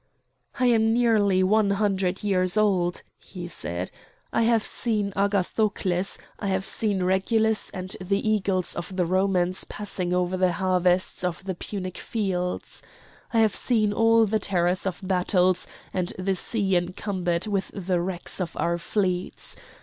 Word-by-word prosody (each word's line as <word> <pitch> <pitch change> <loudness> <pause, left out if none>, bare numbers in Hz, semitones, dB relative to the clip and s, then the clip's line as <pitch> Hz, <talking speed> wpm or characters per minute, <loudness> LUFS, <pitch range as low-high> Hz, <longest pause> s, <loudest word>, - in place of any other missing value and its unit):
"I 255 - +3
am 225 -2 +4
nearly 210 -6 +3
one 210 +2 +3
hundred 195 -2 0
years 185 -1 +2
old," 185 -5 +1 0.2
he 175 -2 -8
said. 90 - -5 0.4
"I - - +2
have 230 -1 +3
seen 210 -4 -1
Agathocles; 195 -1 0 0.2
I 200 - -3
have 190 0 0
seen 205 -4 0
Regulus 220 +4 +2
and 185 0 -4
the 195 +3 0
eagles 195 -4 +1
of 175 +2 -6
the 180 -1 +1
Romans 185 0 +1
passing 190 -4 -3
over 180 +1 0
the 185 -1 +2
harvests 185 -1 +1
of 180 +1 -2
the 190 0 -3
Punic 185 0 -5
fields! 185 -5 -3 0.5
I 230 - +3
have 220 -2 +3
seen 215 -4 +1
all 225 +1 +4
the 215 +1 0
terrors 180 -1 +1
of 185 +1 -4
battles 185 -1 +2 0.3
and 180 -1 -1
the 190 +1 0
sea 195 0 +1
encumbered 180 0 -1
with 200 -2 -1
the 185 -3 -1
wrecks 180 +1 -4
of 175 - -4
our 170 0 0
fleets! 185 -1 -2
190 Hz, 150 wpm, -25 LUFS, 180-210 Hz, 0.5 s, am